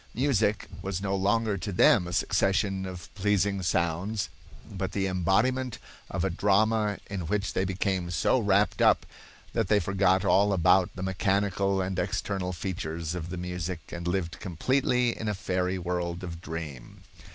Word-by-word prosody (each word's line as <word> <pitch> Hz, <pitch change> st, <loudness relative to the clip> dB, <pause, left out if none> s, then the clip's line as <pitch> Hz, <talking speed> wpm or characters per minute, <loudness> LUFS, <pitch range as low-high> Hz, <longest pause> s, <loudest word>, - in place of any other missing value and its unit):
Music 110 Hz, -5 st, +1 dB
was 95 Hz, -1 st, -3 dB
no 100 Hz, 0 st, -1 dB
longer 105 Hz, +1 st, +1 dB
to 100 Hz, +3 st, -4 dB
them 90 Hz, 0 st, +5 dB
a -, -, -5 dB
succession 95 Hz, 0 st, +1 dB
of 90 Hz, -2 st, -9 dB
pleasing 100 Hz, -1 st, +1 dB
sounds, 90 Hz, +4 st, 0 dB, 0.4 s
but 95 Hz, 0 st, -4 dB
the 95 Hz, -1 st, 0 dB
embodiment 105 Hz, +8 st, +1 dB, 0.3 s
of 95 Hz, -, -2 dB
a -, -, +1 dB
drama 105 Hz, +3 st, +2 dB
in 95 Hz, -5 st, -4 dB
which 105 Hz, +1 st, -1 dB
they 95 Hz, -, +1 dB
became 95 Hz, -1 st, -1 dB
so 90 Hz, +9 st, +2 dB
wrapped 100 Hz, -3 st, +2 dB
up -, -, +4 dB, 0.5 s
that -, -, 0 dB
they 105 Hz, +1 st, +4 dB
forgot 95 Hz, -1 st, +2 dB
all 100 Hz, +1 st, +4 dB
about 90 Hz, 0 st, +4 dB
the 95 Hz, -, -5 dB
mechanical 95 Hz, 0 st, +1 dB
and 95 Hz, 0 st, -2 dB
external 95 Hz, -3 st, -2 dB
features 85 Hz, -3 st, -4 dB
of 90 Hz, -1 st, -5 dB
the 90 Hz, -, -5 dB
music 90 Hz, -2 st, -5 dB
and 85 Hz, 0 st, -5 dB
lived 90 Hz, -2 st, -2 dB
completely 125 Hz, -, +1 dB
in 110 Hz, -, -5 dB
a 105 Hz, -, 0 dB
fairy 95 Hz, -2 st, -1 dB
world 90 Hz, 0 st, -3 dB
of 85 Hz, -2 st, -6 dB
dream. 80 Hz, -7 st, -7 dB
95 Hz, 160 wpm, -28 LUFS, 90-100 Hz, 0.5 s, them